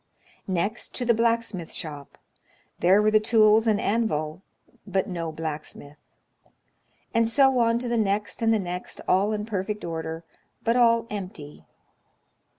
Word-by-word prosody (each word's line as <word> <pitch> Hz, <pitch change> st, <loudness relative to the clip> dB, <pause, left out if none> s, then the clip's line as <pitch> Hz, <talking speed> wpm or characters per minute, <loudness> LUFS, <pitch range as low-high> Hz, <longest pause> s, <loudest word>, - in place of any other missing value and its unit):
Next, 190 Hz, +5 st, -2 dB
to 250 Hz, -, -2 dB
the 235 Hz, -, +4 dB
blacksmith 230 Hz, -6 st, -1 dB
shop: 145 Hz, -3 st, -7 dB, 0.6 s
there 190 Hz, +4 st, +4 dB
were 215 Hz, -, +3 dB
the 215 Hz, -, +5 dB
tools 220 Hz, 0 st, +4 dB
and 210 Hz, -2 st, +3 dB
anvil, 175 Hz, -8 st, -1 dB, 0.5 s
but 195 Hz, -1 st, 0 dB
no 170 Hz, -3 st, -4 dB
blacksmith. 155 Hz, -2 st, -7 dB, 1.1 s
And 230 Hz, -1 st, +3 dB
so 265 Hz, 0 st, +4 dB
on 230 Hz, 0 st, +3 dB
to 245 Hz, +1 st, -3 dB
the 235 Hz, 0 st, 0 dB
next 205 Hz, -1 st, -1 dB
and 225 Hz, 0 st, +3 dB
the 225 Hz, -, +4 dB
next, 180 Hz, -2 st, -5 dB
all 195 Hz, +3 st, +3 dB
in 210 Hz, -1 st, -2 dB
perfect 210 Hz, -1 st, -3 dB
order, 165 Hz, 0 st, -5 dB, 0.4 s
but 230 Hz, +1 st, +2 dB
all 230 Hz, -2 st, +4 dB
empty. 180 Hz, -8 st, -8 dB
210 Hz, 145 wpm, -25 LUFS, 170-230 Hz, 1.1 s, the